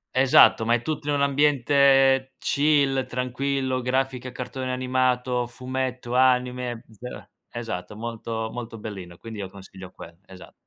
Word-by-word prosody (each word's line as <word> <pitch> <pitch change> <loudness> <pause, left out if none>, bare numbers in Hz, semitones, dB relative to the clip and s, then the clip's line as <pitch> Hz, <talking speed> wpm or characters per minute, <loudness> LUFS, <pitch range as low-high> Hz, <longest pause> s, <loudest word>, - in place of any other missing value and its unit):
Esatto, 130 -3 +6
ma 115 - +3
è 120 - +2
tutto 150 +1 -4
in - - +2
un 145 - 0
ambiente 135 -1 +3
chill, 140 -3 +2
tranquillo, 130 +1 -2
grafica, 130 0 -1
cartone 130 +1 -5
animato, 125 -1 0
fumetto, 125 0 -4
anime, 125 -2 +1 0.2
uhm 125 - -8 0.2
Esatto. 115 -4 -6
Molto 115 0 -4
molto 115 -2 -7
bellino. 95 -5 -8
Quindi 110 -2 -9
io 95 -2 -5
consiglio 95 -1 -12
quell 85 - -12
esa 95 -2 -13
125 Hz, 135 wpm, -24 LUFS, 115-135 Hz, 0.2 s, Esatto